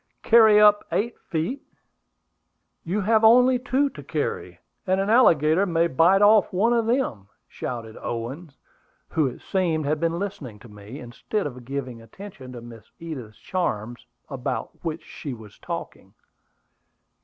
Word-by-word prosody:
"Carry 220 Hz, -2 st, +6 dB
up 210 Hz, -1 st, +6 dB
eight 235 Hz, +3 st, -1 dB
feet! 175 Hz, -, -3 dB, 1.2 s
You 190 Hz, +5 st, -2 dB
have 220 Hz, +2 st, +2 dB
only 250 Hz, +3 st, +6 dB
two 265 Hz, +2 st, +1 dB
to -, -, -10 dB
carry, -, -, -4 dB, 0.3 s
and 185 Hz, +1 st, +2 dB
an 195 Hz, +2 st, 0 dB
alligator 170 Hz, -, +4 dB
may 170 Hz, -1 st, +2 dB
bite 170 Hz, +7 st, +4 dB
off 210 Hz, -1 st, +5 dB
one 215 Hz, +6 st, +2 dB
of 230 Hz, -2 st, +1 dB
them," 230 Hz, -, -1 dB, 0.2 s
shouted 115 Hz, -3 st, -6 dB
Owen, 125 Hz, +9 st, -5 dB, 0.6 s
who 155 Hz, -3 st, +1 dB
it 125 Hz, -, -7 dB
seemed 165 Hz, -5 st, -1 dB
had 150 Hz, +1 st, 0 dB
been 165 Hz, +1 st, 0 dB
listening 160 Hz, -, -6 dB
to 115 Hz, -, -15 dB
me, 105 Hz, +5 st, -11 dB
instead 125 Hz, -, -4 dB
of 125 Hz, -4 st, -7 dB
giving 130 Hz, -3 st, -5 dB
attention 130 Hz, -, -11 dB
to 120 Hz, -, -8 dB
Miss 115 Hz, -2 st, -12 dB
Edith's 130 Hz, -10 st, -8 dB
charms, 120 Hz, -, -4 dB, 0.2 s
about 130 Hz, -4 st, -4 dB
which 165 Hz, -1 st, -4 dB
she 140 Hz, -5 st, -7 dB
was 110 Hz, -3 st, -15 dB
talking. -, -, -7 dB
165 Hz, 145 wpm, -24 LUFS, 125-205 Hz, 1.2 s, Carry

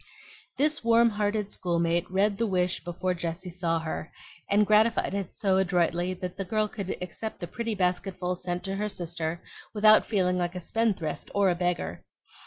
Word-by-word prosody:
This 300 Hz, +1 st, +1 dB
warm 230 Hz, 0 st, +5 dB
hearted 205 Hz, 0 st, -1 dB
schoolmate 170 Hz, 0 st, 0 dB
read 200 Hz, +2 st, +1 dB
the 230 Hz, -, +2 dB
wish 180 Hz, -3 st, 0 dB
before 180 Hz, +2 st, -2 dB
Jessie 175 Hz, +1 st, -4 dB
saw 170 Hz, -1 st, 0 dB
her, 160 Hz, -1 st, -4 dB, 0.4 s
and 205 Hz, +1 st, +4 dB
gratified 215 Hz, 0 st, +3 dB
it 195 Hz, -3 st, -4 dB
so 190 Hz, -2 st, +2 dB
adroitly 180 Hz, -1 st, +1 dB
that 180 Hz, 0 st, -6 dB
the 195 Hz, -, -2 dB
girl 215 Hz, +3 st, 0 dB
could 200 Hz, -3 st, -4 dB
accept 215 Hz, +5 st, -6 dB
the 175 Hz, -, -4 dB
pretty 230 Hz, +5 st, -3 dB
basketful 180 Hz, -1 st, -1 dB
sent 175 Hz, 0 st, -4 dB
to 195 Hz, 0 st, -3 dB
her 210 Hz, +1 st, -1 dB
sister 170 Hz, -2 st, -3 dB, 0.3 s
without 215 Hz, +1 st, +6 dB
feeling 180 Hz, -4 st, +1 dB
like 175 Hz, 0 st, -2 dB
a -, -, -3 dB
spendthrift 180 Hz, -6 st, -1 dB
or 200 Hz, -2 st, +4 dB
a -, -, 0 dB
beggar. 175 Hz, -, -2 dB
185 Hz, 175 wpm, -28 LUFS, 175-210 Hz, 0.4 s, without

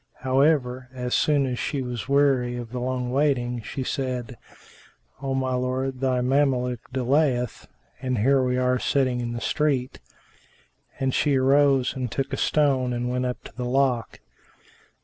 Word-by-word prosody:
However, 130 Hz, -2 st, +1 dB
as 125 Hz, -1 st, -3 dB
soon 145 Hz, -2 st, +3 dB
as 125 Hz, -2 st, -3 dB
she 140 Hz, -3 st, -2 dB
was 125 Hz, 0 st, -5 dB
weary 135 Hz, -3 st, +2 dB
of 120 Hz, -1 st, -7 dB
long 125 Hz, 0 st, -2 dB
waiting, 125 Hz, -4 st, +1 dB
she 130 Hz, +4 st, -5 dB
said, 125 Hz, -2 st, -3 dB, 0.9 s
"O 135 Hz, -1 st, -2 dB
my 130 Hz, -1 st, 0 dB
lord, 130 Hz, +1 st, -2 dB
thy 130 Hz, -1 st, +1 dB
Mameluke 125 Hz, -2 st, 0 dB
delayeth; 130 Hz, -1 st, 0 dB, 0.3 s
and 130 Hz, -1 st, -1 dB
here 135 Hz, +6 st, +3 dB
are 125 Hz, 0 st, +1 dB
we 130 Hz, -, 0 dB
sitting 130 Hz, -3 st, +1 dB
in 120 Hz, 0 st, -3 dB
the 120 Hz, -, -4 dB
street;" 140 Hz, -4 st, 0 dB, 1.0 s
and 135 Hz, -1 st, 0 dB
she 145 Hz, -2 st, +2 dB
arose 135 Hz, 0 st, +3 dB
and 125 Hz, -3 st, -3 dB
took 135 Hz, 0 st, -3 dB
a -, -, -1 dB
stone 135 Hz, -4 st, +2 dB
and 120 Hz, 0 st, -2 dB
went 125 Hz, 0 st, -1 dB
up 125 Hz, -, -5 dB
to -, -, -12 dB
the 125 Hz, -, -4 dB
lock. 125 Hz, -2 st, 0 dB
130 Hz, 155 wpm, -25 LUFS, 125-135 Hz, 1.0 s, soon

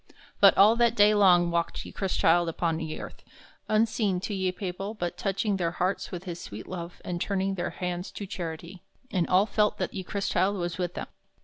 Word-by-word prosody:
But -, -, +7 dB
all 215 Hz, +3 st, +7 dB
that 235 Hz, -1 st, +3 dB
day 205 Hz, 0 st, +6 dB
long 180 Hz, -4 st, +5 dB
walked 170 Hz, 0 st, -1 dB
ye -, -, -9 dB
Chrystchilde 175 Hz, -3 st, +2 dB
upon 165 Hz, 0 st, -1 dB
ye 160 Hz, -1 st, -5 dB
earth, -, -, -9 dB, 0.5 s
unseen 215 Hz, -3 st, +2 dB
to 210 Hz, -, -4 dB
ye 190 Hz, -1 st, 0 dB
people 195 Hz, +2 st, -5 dB
but 175 Hz, -4 st, -3 dB
toching 195 Hz, +1 st, -1 dB
their 170 Hz, -2 st, -1 dB
hartes 185 Hz, +2 st, -1 dB
with 180 Hz, -1 st, -6 dB
his 175 Hz, -2 st, -6 dB
swete 105 Hz, +2 st, -8 dB
love 175 Hz, -1 st, -7 dB
and 175 Hz, -1 st, -3 dB
turning 195 Hz, -1 st, 0 dB
their 175 Hz, -2 st, -2 dB
hands 180 Hz, 0 st, -4 dB
to 205 Hz, -, -6 dB
charity; 175 Hz, -1 st, -6 dB, 0.3 s
and 180 Hz, -4 st, +1 dB
all 185 Hz, +2 st, +4 dB
felt 210 Hz, -1 st, +1 dB
that -, -, -3 dB
ye 190 Hz, -, -4 dB
Chrystchilde 200 Hz, 0 st, 0 dB
was 175 Hz, 0 st, -3 dB
with 175 Hz, -1 st, -2 dB
them. -, -, -4 dB
185 Hz, 200 wpm, -27 LUFS, 175-200 Hz, 0.5 s, But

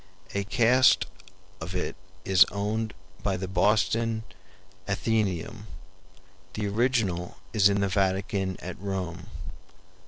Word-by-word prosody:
A 100 Hz, -, 0 dB
cast 125 Hz, +4 st, +4 dB, 0.5 s
of 85 Hz, +3 st, -6 dB
it 90 Hz, -, -2 dB, 0.3 s
is 95 Hz, -1 st, +7 dB
owned 110 Hz, +2 st, -2 dB, 0.3 s
by 95 Hz, -2 st, 0 dB
the 95 Hz, +1 st, -4 dB
Boston 110 Hz, +4 st, +2 dB, 0.6 s
Athenaeum; 105 Hz, 0 st, -1 dB, 0.9 s
the 105 Hz, -1 st, -2 dB
original 100 Hz, -6 st, 0 dB, 0.2 s
is 105 Hz, -2 st, +5 dB
in 100 Hz, 0 st, +1 dB
the 100 Hz, -, +2 dB
Vatican 95 Hz, 0 st, 0 dB
at 90 Hz, 0 st, -7 dB
Rome. 95 Hz, -2 st, -4 dB
100 Hz, 105 wpm, -27 LUFS, 95-110 Hz, 0.9 s, is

